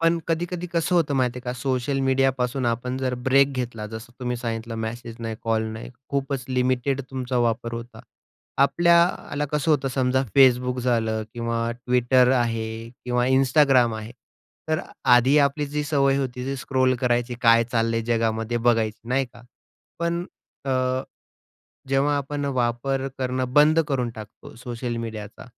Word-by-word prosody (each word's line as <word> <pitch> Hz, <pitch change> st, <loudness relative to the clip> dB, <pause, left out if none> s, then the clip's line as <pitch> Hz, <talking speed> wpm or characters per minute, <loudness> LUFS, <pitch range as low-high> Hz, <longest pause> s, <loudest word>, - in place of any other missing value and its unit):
पण 165 Hz, +1 st, +3 dB
कधीकधी 175 Hz, +2 st, -2 dB
कसं 170 Hz, +1 st, +1 dB
होतं 160 Hz, -5 st, +2 dB
माहिती 125 Hz, -2 st, 0 dB
आहे -, -, -8 dB
का 125 Hz, -, -2 dB
सोशल 130 Hz, +2 st, -1 dB
मीडियापासून 130 Hz, -1 st, +1 dB
आपण 120 Hz, +2 st, -1 dB
जर 130 Hz, -1 st, -1 dB
ब्रेक 135 Hz, +1 st, +4 dB
घेतला 115 Hz, -3 st, -6 dB
जसं 110 Hz, +2 st, -9 dB
तुम्ही 125 Hz, -1 st, -2 dB
सांगितलं 115 Hz, -1 st, -4 dB
मेसेज 115 Hz, +1 st, -6 dB
नाही, 115 Hz, -1 st, -4 dB
कॉल 115 Hz, -1 st, +1 dB
नाही 110 Hz, +2 st, -8 dB, 0.2 s
खूपच 140 Hz, -2 st, -2 dB
लिमिटेड 130 Hz, +1 st, 0 dB
तुमचा 130 Hz, -1 st, -3 dB
वापर 115 Hz, +1 st, -2 dB
होता. 115 Hz, +1 st, -8 dB, 0.6 s
आपल्याला 170 Hz, 0 st, +2 dB
कसं 150 Hz, +1 st, +1 dB
होतं 140 Hz, -3 st, +2 dB
समजा 130 Hz, 0 st, +1 dB, 0.2 s
Facebook 125 Hz, -1 st, +5 dB
झालं 115 Hz, -3 st, 0 dB
किंवा 115 Hz, -1 st, -2 dB, 0.3 s
Twitter 125 Hz, +1 st, +4 dB
आहे 115 Hz, -3 st, 0 dB, 0.4 s
किंवा 125 Hz, 0 st, +1 dB
Instagram 130 Hz, -2 st, +4 dB
आहे. 110 Hz, +2 st, -8 dB, 0.6 s
तर 155 Hz, +1 st, +1 dB, 0.3 s
आधी 130 Hz, +4 st, +4 dB
आपली 145 Hz, +1 st, +2 dB
जी 150 Hz, +1 st, -2 dB
सवय 140 Hz, -2 st, +2 dB
होती 125 Hz, -2 st, -3 dB
ती 135 Hz, -, -2 dB
स्क्रॉल 130 Hz, -1 st, +1 dB
करायची 120 Hz, -1 st, 0 dB
काय 115 Hz, -1 st, +5 dB
चाललंय 115 Hz, -1 st, +1 dB
जगामध्ये 115 Hz, 0 st, 0 dB
बघायची 115 Hz, -2 st, +2 dB
नाही 135 Hz, +2 st, +2 dB
का. 120 Hz, -1 st, -15 dB, 0.6 s
पण 170 Hz, +1 st, -1 dB, 0.4 s
अ, 135 Hz, -, -2 dB, 1.2 s
जेव्हा 140 Hz, +2 st, +2 dB
आपण 145 Hz, +1 st, -3 dB
वापर 130 Hz, 0 st, -1 dB
करणं 130 Hz, -1 st, -2 dB
बंद 155 Hz, +2 st, +6 dB
करून 130 Hz, -4 st, 0 dB
टाकतो 110 Hz, -2 st, -11 dB
सोशल 120 Hz, 0 st, -5 dB
मीडियाचा. 110 Hz, -2 st, -7 dB
125 Hz, 150 wpm, -24 LUFS, 115-140 Hz, 1.2 s, बंद